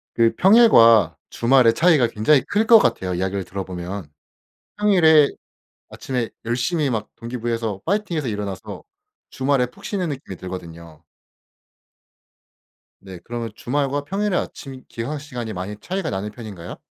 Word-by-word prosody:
그 115 Hz, -1 st, +3 dB
평일과 145 Hz, -, +6 dB
주말에 120 Hz, -1 st, +4 dB
차이가 160 Hz, -6 st, +4 dB
굉장히 115 Hz, +6 st, +2 dB
클 210 Hz, +2 st, 0 dB
것 230 Hz, -, +9 dB
같아요 95 Hz, -, 0 dB
이야기를 95 Hz, +2 st, -2 dB
들어 95 Hz, 0 st, -6 dB
보면. 90 Hz, -1 st, -6 dB, 0.7 s
평일에 165 Hz, -8 st, +5 dB, 0.6 s
아침에 125 Hz, -4 st, -4 dB, 0.2 s
열심히 140 Hz, +6 st, 0 dB
막 110 Hz, -4 st, -3 dB
동기부여해서 115 Hz, -4 st, -4 dB
화이팅해서 175 Hz, -, -1 dB
일어나서 100 Hz, -3 st, -5 dB, 0.5 s
주말에 135 Hz, -1 st, 0 dB
푹 195 Hz, +11 st, -18 dB
쉬는 185 Hz, -5 st, -2 dB
느낌이 130 Hz, -10 st, -6 dB
들거든요. 85 Hz, -3 st, -9 dB, 2.0 s
네 95 Hz, -2 st, -10 dB
그러면 115 Hz, -1 st, -5 dB
주말과 140 Hz, +3 st, -2 dB
평일에 195 Hz, +4 st, -2 dB
아침 130 Hz, -2 st, -6 dB
기상 135 Hz, +6 st, -5 dB
시간이 125 Hz, -6 st, -6 dB
많이 95 Hz, +2 st, -6 dB
차이가 185 Hz, -2 st, -3 dB
나는 100 Hz, +2 st, -4 dB
편인가요? 105 Hz, -7 st, -9 dB
120 Hz, 325 characters per minute, -21 LUFS, 100-155 Hz, 2.0 s, 것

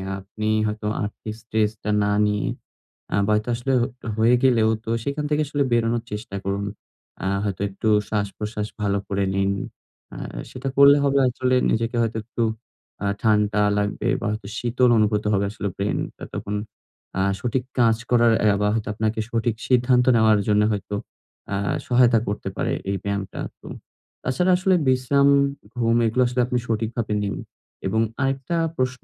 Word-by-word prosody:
অ্যা 95 Hz, 0 st, -5 dB
আপনি 105 Hz, +3 st, -5 dB, 0.2 s
হয়তো 105 Hz, 0 st, -3 dB, 0.2 s
আর্থিক 105 Hz, +1 st, -5 dB
স্ট্রেসটা 110 Hz, -1 st, -1 dB
না 105 Hz, 0 st, +1 dB
নিয়ে 105 Hz, -1 st, 0 dB, 0.7 s
আ -, -, +3 dB
বা 105 Hz, -, +3 dB
তা -, -, -5 dB
আসলেও 130 Hz, +2 st, 0 dB
একটা 125 Hz, -2 st, -13 dB
হয়ে 115 Hz, +3 st, +5 dB
গেলেও 115 Hz, -4 st, +4 dB, 0.2 s
তো -, -, -5 dB
সেখান 140 Hz, +3 st, -2 dB
থেকে 150 Hz, 0 st, +2 dB
আসলে 145 Hz, -1 st, 0 dB
বেরোনোর 115 Hz, 0 st, +1 dB
চেষ্টা 105 Hz, -2 st, -6 dB
করুন। 100 Hz, +1 st, -1 dB, 0.6 s
আ -, -, +1 dB, 0.2 s
হয়তো 100 Hz, -2 st, -3 dB
একটু 100 Hz, +3 st, -2 dB, 0.2 s
শ্বাস-প্রশ্বাস 105 Hz, +1 st, -3 dB
ভালো 100 Hz, -1 st, +1 dB
করে 100 Hz, 0 st, 0 dB
নিন। 95 Hz, 0 st, +1 dB, 0.6 s
আ -, -, -7 dB, 0.3 s
সেটা 130 Hz, +2 st, -4 dB
করলে 140 Hz, +1 st, +8 dB
হবে 140 Hz, 0 st, +3 dB
আসলে 130 Hz, +1 st, 0 dB, 0.2 s
নিজেকে 115 Hz, +2 st, 0 dB
হয়তো 115 Hz, -1 st, -1 dB
একটু 120 Hz, +1 st, -3 dB, 0.6 s
আ -, -, 0 dB, 0.2 s
ঠান্ডা 105 Hz, -1 st, +2 dB, 0.2 s
লাগবে 105 Hz, 0 st, -1 dB
বা -, -, -3 dB
হয়তো 105 Hz, -2 st, -5 dB
শীতল 125 Hz, +1 st, +2 dB
অনুভূত 105 Hz, 0 st, +2 dB
হবে 100 Hz, 0 st, +2 dB
আসলে 105 Hz, -1 st, -4 dB
ব্রেইনটা 100 Hz, +1 st, -3 dB
তখন। 105 Hz, +1 st, -4 dB, 0.6 s
আ -, -, +3 dB, 0.2 s
সঠিক 125 Hz, +3 st, -1 dB, 0.2 s
কাজ 115 Hz, -2 st, +5 dB, 0.2 s
করার 120 Hz, -1 st, +5 dB
অ্যা 105 Hz, -1 st, +4 dB
বা 105 Hz, -, +2 dB
হয়তো 110 Hz, -1 st, -2 dB
আপনাকে 110 Hz, +1 st, -1 dB
সঠিক 115 Hz, -1 st, 0 dB
সিদ্ধান্ত 125 Hz, 0 st, +3 dB
নেওয়ার 110 Hz, -2 st, +5 dB
জন্য 105 Hz, 0 st, +4 dB
হয়তো 105 Hz, 0 st, -3 dB, 0.5 s
অ্যা 100 Hz, -, -1 dB, 0.3 s
সহায়তা 120 Hz, -2 st, +5 dB
করতে 105 Hz, -, -3 dB
পারে -, -, 0 dB, 0.2 s
এই 100 Hz, -, -1 dB
ব্যায়ামটা। 100 Hz, -1 st, -3 dB, 0.2 s
তো -, -, -13 dB, 0.6 s
তাছাড়া 180 Hz, +8 st, +2 dB
আসলে 185 Hz, +1 st, +3 dB
বিশ্রাম, 130 Hz, +2 st, +3 dB, 0.5 s
ঘুম 115 Hz, -1 st, +2 dB
এগুলো 115 Hz, +3 st, +1 dB
আসলে 125 Hz, +1 st, 0 dB
আপনি 125 Hz, 0 st, -1 dB
সঠিকভাবে 115 Hz, 0 st, -1 dB
নিন 100 Hz, -1 st, -2 dB, 0.5 s
এবং 110 Hz, +3 st, +1 dB, 0.2 s
আরেকটা 135 Hz, +4 st, -1 dB, 0.2 s
প্রশ্ন 130 Hz, 0 st, -1 dB
110 Hz, 165 wpm, -23 LUFS, 105-125 Hz, 0.7 s, করলে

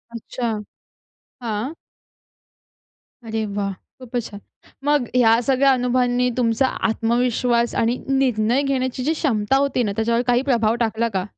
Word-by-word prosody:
अच्छा, 235 Hz, +1 st, -4 dB, 0.9 s
हां. 225 Hz, +4 st, -3 dB, 1.5 s
अरे 220 Hz, -1 st, -2 dB
वाह! 200 Hz, -1 st, -1 dB, 0.3 s
खूपच 245 Hz, -1 st, -4 dB
छान. 205 Hz, -, -9 dB, 0.5 s
मग 290 Hz, -4 st, +2 dB
ह्या 230 Hz, -2 st, +5 dB
सगळ्या 270 Hz, +2 st, +3 dB
अनुभवांनी 250 Hz, -1 st, +1 dB
तुमचा 240 Hz, +2 st, +2 dB, 0.2 s
आत्मविश्वास 235 Hz, +1 st, +1 dB
आणि 230 Hz, +2 st, +1 dB
निर्णय 255 Hz, -2 st, +2 dB
घेण्याची 260 Hz, -2 st, -1 dB
जी 310 Hz, +5 st, +1 dB
क्षमता 265 Hz, -7 st, 0 dB
होती 275 Hz, -3 st, +1 dB
ना, 210 Hz, -, -1 dB
त्याच्यावर 230 Hz, +2 st, +1 dB
काही 245 Hz, 0 st, +3 dB
प्रभाव 225 Hz, -2 st, +2 dB
टाकला 225 Hz, +1 st, -1 dB
का? 190 Hz, -1 st, 0 dB
240 Hz, 125 wpm, -21 LUFS, 225-255 Hz, 1.5 s, ह्या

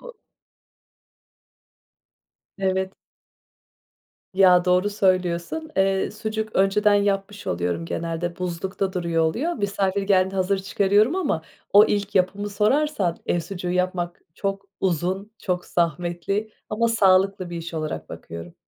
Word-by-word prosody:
o -, -, -11 dB, 2.4 s
Evet. 190 Hz, 0 st, 0 dB, 1.4 s
Ya, 185 Hz, -2 st, +5 dB
doğru 180 Hz, +3 st, +3 dB
söylüyorsun, 185 Hz, -, 0 dB
eee, 195 Hz, 0 st, +2 dB
sucuk 215 Hz, 0 st, -4 dB
önceden 200 Hz, +2 st, +4 dB
yapmış 200 Hz, 0 st, 0 dB
oluyorum, 85 Hz, -1 st, -1 dB
genelde 170 Hz, -, -3 dB
buzlukta 185 Hz, +2 st, -3 dB
duruyor 170 Hz, -2 st, 0 dB
oluyor, 270 Hz, -, 0 dB
misafir 200 Hz, -, -1 dB
geldiğinde 190 Hz, -1 st, +2 dB
hazır 190 Hz, +1 st, +1 dB
çıkarıyorum 205 Hz, -, +2 dB
ama 280 Hz, -, 0 dB, 0.3 s
o 205 Hz, +1 st, +9 dB
ilk 205 Hz, -1 st, -1 dB
yapımı 195 Hz, +2 st, +1 dB
sorarsan, 210 Hz, -, +1 dB
ev 175 Hz, -, +1 dB
sucuğu 175 Hz, +1 st, -5 dB
yapmak 180 Hz, -1 st, -1 dB
çok 195 Hz, +1 st, -3 dB, 0.2 s
uzun, 185 Hz, +3 st, -1 dB
çok 180 Hz, -2 st, -2 dB
zahmetli 175 Hz, +5 st, -1 dB, 0.2 s
ama 230 Hz, +2 st, +1 dB
sağlıklı 190 Hz, -4 st, +3 dB
bir 175 Hz, -, -5 dB
iş 165 Hz, 0 st, -6 dB
olarak 155 Hz, -2 st, -4 dB
bakıyorum. 85 Hz, 0 st, -9 dB
190 Hz, 115 wpm, -24 LUFS, 175-205 Hz, 2.4 s, o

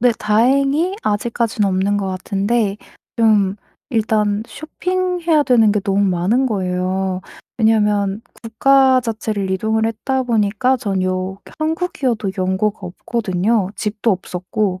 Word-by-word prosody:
네 245 Hz, 0 st, +4 dB
다행히 275 Hz, -, +2 dB
아직까지는 215 Hz, 0 st, 0 dB
없는 190 Hz, +2 st, +1 dB
것 200 Hz, -1 st, -2 dB
같은데 200 Hz, +3 st, -1 dB, 0.4 s
좀 210 Hz, -4 st, +3 dB, 0.3 s
일단 215 Hz, -2 st, +1 dB
쇼핑해야 355 Hz, -1 st, -1 dB
되는 225 Hz, -6 st, +4 dB
게 210 Hz, -, 0 dB
너무 195 Hz, 0 st, 0 dB
많은 195 Hz, +8 st, +1 dB
거예요. 185 Hz, -2 st, -1 dB, 0.4 s
왜냐하면 210 Hz, -2 st, +2 dB, 0.2 s
국가 260 Hz, +3 st, +4 dB
자체를 215 Hz, -4 st, -3 dB
이동을 220 Hz, +4 st, 0 dB
했다 260 Hz, +4 st, -1 dB
보니까 230 Hz, +2 st, +1 dB
전 195 Hz, -5 st, -2 dB
요 185 Hz, +1 st, -2 dB, 0.2 s
한국이어도 310 Hz, -, -1 dB
연고가 190 Hz, +3 st, -1 dB
없거든요. 195 Hz, +1 st, -1 dB
집도 215 Hz, +2 st, -1 dB
없었고 185 Hz, +1 st, -3 dB
215 Hz, 275 characters per minute, -19 LUFS, 195-240 Hz, 0.4 s, 네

